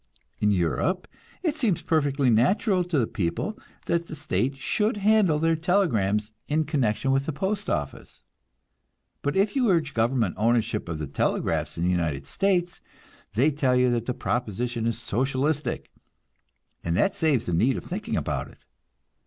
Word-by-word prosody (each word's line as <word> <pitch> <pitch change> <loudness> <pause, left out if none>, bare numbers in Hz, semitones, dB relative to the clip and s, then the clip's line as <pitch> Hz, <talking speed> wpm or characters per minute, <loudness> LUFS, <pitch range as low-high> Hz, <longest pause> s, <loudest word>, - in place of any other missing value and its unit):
In 105 - +2
Europe 105 - 0 0.4
it 315 -4 0
seems 225 - 0
perfectly 140 -5 +2
natural 185 - +3
to 175 -3 -1
the 120 - +3
people 100 - -3 0.3
that 170 0 0
the - - -7
state 140 -2 -1
should 210 - 0
handle 205 -6 +3
their 165 +1 +2
telegrams 115 - +1 0.2
in 155 +1 +1
connection 135 -3 0
with 135 +1 +1
the - - 0
postoffice; 190 - -3 1.0
but 145 - -1
if 200 +4 +2
you 250 -5 +3
urge 160 -6 +1
government 115 -4 +1
ownership 115 -3 +1
of 80 - -3
the 75 - -3
telegraphs 70 - -1
in 85 - -1
the 90 - +2
United 80 -6 -1
States, 180 - 0 0.5
they 130 +9 +3
tell 135 -3 +1
you 125 0 +3
that 120 -1 -1
the 125 - -1
proposition 120 0 -2
is 115 - -1
"socialistic," 130 +4 -1 0.9
and 85 0 0
that 195 - +2
saves 150 -8 +1
the 90 - -2
need 120 +11 +2
of - - -6
thinking 195 +5 -3
about - - -2
it. - - -19
135 Hz, 160 wpm, -26 LUFS, 110-170 Hz, 1.0 s, natural